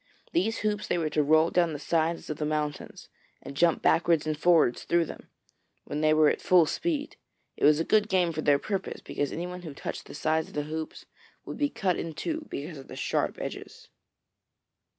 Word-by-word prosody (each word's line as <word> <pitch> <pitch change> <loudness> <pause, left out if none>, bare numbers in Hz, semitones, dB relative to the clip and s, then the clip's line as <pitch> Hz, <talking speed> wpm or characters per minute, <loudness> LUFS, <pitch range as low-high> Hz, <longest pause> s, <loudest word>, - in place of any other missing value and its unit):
These 230 -10 0
hoops 210 -1 -1
they - - 0
were 160 -3 -1
to 150 - +2
roll 155 +3 +4
down 170 -2 +2
the - - -4
sides 165 +3 -1
of 150 - -4
the 155 - -3
mountains, 150 -1 -3 0.3
and 140 - -10
jump 170 +2 +2
backwards 165 -1 +3
and 155 0 -1
forwards 160 -5 +3
through 170 -1 +2
them, - - -10 0.5
when 150 - -4
they 155 0 +4
were 155 0 +5
at - - +1
full 180 -3 +5
speed. 300 - -2 0.4
It - - 0
was 150 +1 +6
a - - +2
good 210 +4 +2
game 180 -3 +2
for 155 - -3
their 145 -2 +4
purpose, 195 +5 -4
because 145 - -3
anyone 180 +2 -5
who 155 -5 -8
touched - - -6
the - - -10
side 155 +1 0
of - - -15
the 150 - -1
hoops 155 +1 -6 0.4
would - - -6
be 290 -1 +2
cut 185 -8 -1
in 165 -2 -5
two, 320 - -4
because 150 +1 -6
of 135 - -12
the - - -9
sharp - - -1
edges. - - -7
160 Hz, 210 wpm, -28 LUFS, 150-180 Hz, 0.5 s, was